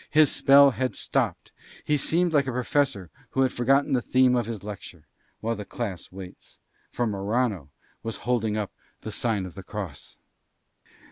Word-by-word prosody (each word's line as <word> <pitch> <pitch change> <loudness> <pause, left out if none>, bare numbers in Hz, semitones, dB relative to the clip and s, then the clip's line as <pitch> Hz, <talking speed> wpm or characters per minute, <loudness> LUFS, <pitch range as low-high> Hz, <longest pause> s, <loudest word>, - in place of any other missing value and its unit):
His 150 -1 +5
spell 140 0 +6
had 130 0 -2
stopped. - - -1 0.3
He 150 - +1
seemed 165 +4 +1
like 140 -2 +3
a - - 0
professor 125 - 0 0.2
who 135 - 0
had 130 -1 +2
forgotten 135 +4 +2
the 125 - +2
theme 130 +1 +3
of 120 -3 0
his 115 -4 -5
lecture, 100 -6 -9 0.4
while 115 +1 -1
the 105 - -6
class 100 -4 -5
waits. 95 -1 -11 0.3
For 120 - -1
Morano 100 - -1 0.3
was 115 -1 -5
holding 115 -3 +1
up 105 -2 -2 0.3
the 110 - -6
sign 105 -2 0
of 90 - -9
the 100 - -8
cross. 95 -7 -7
115 Hz, 165 wpm, -26 LUFS, 100-130 Hz, 0.4 s, spell